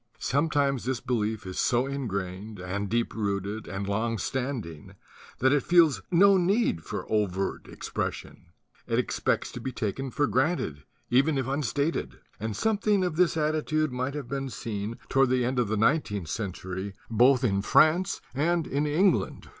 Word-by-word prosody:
Sometimes 140 -2 +1
this 130 -2 -1
belief 110 -4 -2
is 95 0 -5
so 120 +1 +2
ingrained 105 -6 -4
and 95 +2 -3
md 100 -3 -2
long 110 +3 0
standing 125 - -4 0.4
that 130 +2 +3
it 145 - +3
feels 160 - +4
no 195 +3 +6
need 185 - +1
for - - -5
overt 100 -3 -1
expression; - - -5 0.4
it - - 0
expects - - 0
to 125 - -7
be 130 - -3
t 110 -4 -2 0.2
for 145 +3 +1
granted 130 - 0 0.3
even 140 +4 +3
if 135 - 0
unstated; 140 +3 -1 0.2
and 110 0 -3
something 210 - +1
of 180 -3 -1
this 170 -1 +3
attitude 155 -1 0
might 130 +3 -2
have: 140 -3 -5
n 135 -1 -2 0.6
toward 135 -1 +3
the 125 -1 +2
end 125 +1 0
of 120 - +1
the 110 +1 -1
nineteenth 105 - +1
century 95 0 -4
both 125 +3 +4
in 100 -5 +2
Frunre 160 - +3
and 165 +4 +1
in 145 +3 -1
England. 175 +5 +1
130 Hz, 150 wpm, -27 LUFS, 105-150 Hz, 0.6 s, no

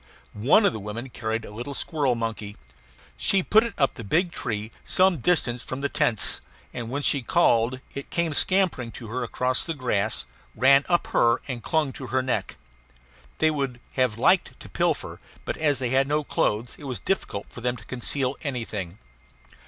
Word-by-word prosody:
One 130 - +4
of - - +3
the 110 - -5
women 110 +5 -6
carried 110 -1 -3
a - - -10
little 120 +6 -6
squirrel 145 -6 0
monkey. 110 -3 -4 0.6
She 190 - +3
put 220 +5 +5
it 235 - -5
up 135 -2 +2
the 115 - -8
big 170 - +1
tree 110 -7 -4
some 185 -2 +3
distance 125 -5 +1
from 130 +1 -5
the 140 - 0
tents; 110 -7 +2 0.3
and 120 -2 -5
when 140 +3 -3
she 140 - +3
called, 120 -4 +2
it 140 - -7
came 170 -2 0
scampering 180 -9 +1
to 115 - -9
her 125 +3 -3
across 125 +1 0
the 165 - -3
grass, 110 - 0 0.3
ran 135 +4 +5
up 175 -1 +3
her, 115 0 +4
and 125 -4 -4
clung 155 -2 0
to 130 - -7
her 130 +2 0
neck. 130 - -2 0.8
They 160 0 +3
would 135 -5 -2
have 125 -4 +1
liked - - +3
to - - -10
pilfer; - - -1 0.3
but - - -2
as 145 -3 +2
they 125 -1 -1
had 135 +1 +3
no 150 +1 +1
clothes 115 -3 -1
it 145 - -10
was 130 -3 -3
difficult 100 - -2
for 120 - -10
them 125 0 0
to 105 -3 -13
conceal 130 +2 -2
anything. 110 - -4
130 Hz, 185 wpm, -25 LUFS, 115-145 Hz, 0.8 s, put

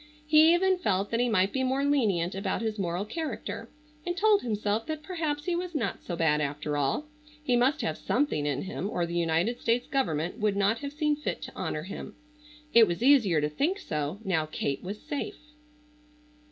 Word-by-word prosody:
He 310 +1 +6
even 375 +1 +2
felt 200 - 0
that 230 - +1
he 245 0 +2
might 195 -3 +2
be 265 - 0
more 265 +2 +1
lenient 205 -12 +2
about 195 +3 -2
his 220 -1 -2
moral 180 +1 -1
character, 315 +9 -5 0.3
and 350 +1 -3
told 415 +1 +4
himself 215 0 -1
that 310 -1 -4
perhaps 310 -5 -3
he 355 - 0
was 355 -1 -4
not 230 -9 -2
so 175 - -4
bad 150 -2 +2
after 150 +1 -2
all, 145 - 0 0.4
he 250 -4 +2
must 250 +4 +2
have 155 - -2
something 245 - 0
in 140 -2 -1
him 195 0 -4
or 175 -4 -1
the 170 - -6
United 170 +7 +1
States 235 +1 +1
government 175 - -1
would 210 -2 +1
not 205 +3 +2
have 280 -1 -5
seen 300 0 +1
fit 300 - -3
to - - -8
honor 150 - -3
him. 190 - -7 0.6
It 230 -1 +8
was 175 +6 -2
easier 230 - +5
to 150 - 0
think 305 - 0
so, 150 - -3
now 160 -5 +1
Kate 140 -2 -2
was 200 +4 -6
safe. 310 +7 -4
220 Hz, 195 wpm, -28 LUFS, -, 0.6 s, It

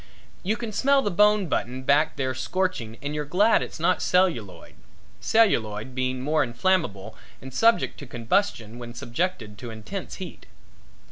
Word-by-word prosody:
You 210 +4 -1
can 235 -2 -5
smell 275 +6 +3
the 205 - 0
bone 210 +2 +4
button 130 -5 -2
back 145 +3 +3
there 130 -1 -1
scorching 155 -8 -2
and 145 +1 -3
you're 150 0 -2
glad 195 +10 +3
it's - - -6
not 180 +3 +2
celluloid, 120 - 0 0.5
celluloid 120 - +2
being 130 0 -2
more 150 +2 +2
inflammable 120 - -1 0.2
and 130 0 -10
subject 225 - +3
to 145 - -9
combustion 120 - -1
when 120 -1 -8
subjected 120 - -3
to 120 - -7
intense 115 - -7
heat. 185 -3 -9
145 Hz, 150 wpm, -25 LUFS, 120-190 Hz, 0.5 s, bone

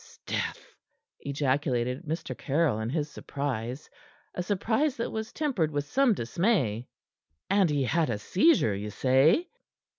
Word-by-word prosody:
"'Sdeath!" - - -3 0.5
ejaculated 135 -1 -1
Mr. 160 +2 -4
Caryll 145 -5 +1
in 110 +1 -2
his 150 +2 -1
surprise, 130 -3 -4 0.5
a - - -3
surprise 220 - 0
that 230 - -2
was 220 0 -4
tempered 260 - 0
with 145 -1 -2
some 255 - +3
dismay. 125 - 0 0.6
"And 195 -3 +4
he 145 -2 +1
had 160 +3 +1
a 115 - -1
seizure, 185 - +3
ye 100 +2 -4
say?" 135 - +3
150 Hz, 130 wpm, -28 LUFS, 125-195 Hz, 0.6 s, And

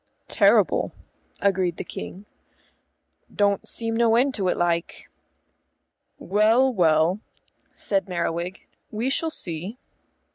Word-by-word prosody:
"Terrible," - - +3 0.5
agreed 185 -3 +1
the - - -4
King. 195 +3 -8 1.1
"Don't 200 -1 +1
seem 225 -1 -3
no 230 -1 +3
end 265 +3 +3
to 195 -5 -1
it, - - +1
like." 170 -1 -2 1.1
"Well, 225 +7 +3
well," 165 0 +3 0.5
said 195 -1 -1
Merriwig, 175 +1 -3 0.2
"we 230 +5 -2
shall 325 +3 +1
see." 180 - -6
195 Hz, 105 wpm, -24 LUFS, 175-225 Hz, 1.1 s, Terrible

